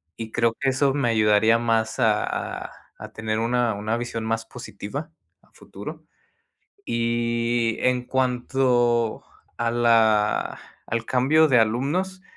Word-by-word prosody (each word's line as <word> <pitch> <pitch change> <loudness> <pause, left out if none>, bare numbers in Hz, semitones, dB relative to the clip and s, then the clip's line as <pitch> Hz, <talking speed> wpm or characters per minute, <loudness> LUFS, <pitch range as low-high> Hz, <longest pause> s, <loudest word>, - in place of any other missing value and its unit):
Y 110 -1 -7
creo 115 -1 +1
que 135 - 0
eso 135 +1 +1
me 135 -5 0
ayudaría 110 0 +4
más 115 0 0
a 110 -3 +3 0.4
a - - -16 0.3
a - - -9
tener 110 -1 -2
una 120 0 +1
una 110 +3 -2
visión 120 -1 -4
más 115 0 -2
positiva - - -7 0.3
a - - -29
futuro. - - -10 0.8
Y 115 0 0
en 125 -1 +1
cuanto 125 -2 +1 0.3
a 120 0 0
la 110 -3 +2 0.3
al 115 0 -2
cambio 150 +5 +3
de 125 - +4
alumnos, 145 - 0
120 Hz, 130 wpm, -24 LUFS, 115-125 Hz, 0.8 s, ayudaría